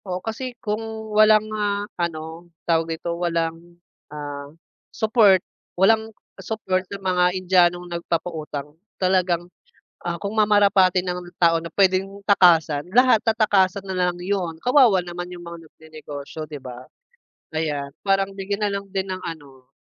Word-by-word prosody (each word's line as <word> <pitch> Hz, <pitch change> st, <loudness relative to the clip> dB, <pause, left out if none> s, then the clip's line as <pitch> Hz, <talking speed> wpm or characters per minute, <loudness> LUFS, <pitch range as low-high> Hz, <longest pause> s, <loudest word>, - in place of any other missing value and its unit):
Oo, 180 Hz, -2 st, -3 dB
kasi 235 Hz, +5 st, -6 dB
kung 215 Hz, -1 st, -3 dB, 0.3 s
walang, 215 Hz, 0 st, +5 dB
ah, 205 Hz, -1 st, -1 dB, 0.2 s
ano, 165 Hz, 0 st, -5 dB, 0.2 s
tawag 165 Hz, -1 st, +1 dB
dito, 170 Hz, +1 st, -4 dB
walang, 170 Hz, 0 st, -2 dB, 0.3 s
ah, 145 Hz, -1 st, -7 dB, 0.4 s
support 215 Hz, -4 st, +4 dB, 0.4 s
walang 220 Hz, +4 st, +3 dB, 0.3 s
support 190 Hz, -4 st, -2 dB
sa 200 Hz, -, -5 dB
mga 185 Hz, -2 st, +1 dB
Indianong 180 Hz, -1 st, +3 dB
nagpapautang 165 Hz, -4 st, -4 dB, 0.2 s
talagang, 185 Hz, -2 st, +1 dB, 0.6 s
ah, 170 Hz, -, -1 dB
kung 200 Hz, +4 st, -5 dB
mamarapatin 200 Hz, -3 st, +4 dB
ng 180 Hz, -1 st, -3 dB, 0.2 s
tao 165 Hz, -1 st, +3 dB
na 165 Hz, -, -7 dB
puwedeng 195 Hz, +2 st, +1 dB
takasan, 165 Hz, -7 st, +4 dB
lahat 250 Hz, -2 st, +6 dB
tatakasan 200 Hz, -3 st, +2 dB
nalang 180 Hz, -2 st, -1 dB
'yon, 180 Hz, -4 st, -2 dB
kawawa 245 Hz, -8 st, +5 dB
naman 175 Hz, 0 st, -6 dB
yung 175 Hz, -, -11 dB
mga 170 Hz, -1 st, -10 dB
nagnenegosyo, 155 Hz, -1 st, -9 dB
'di 145 Hz, -3 st, -9 dB
ba? 125 Hz, 0 st, -9 dB, 0.7 s
Ayan, 145 Hz, -3 st, -2 dB
parang 195 Hz, 0 st, +1 dB
bigyan 200 Hz, +2 st, -2 dB
nalang 200 Hz, -1 st, -4 dB
din 190 Hz, 0 st, -2 dB
ng 185 Hz, -, -9 dB
ano, 140 Hz, -6 st, -9 dB
180 Hz, 135 wpm, -23 LUFS, 165-200 Hz, 0.7 s, lahat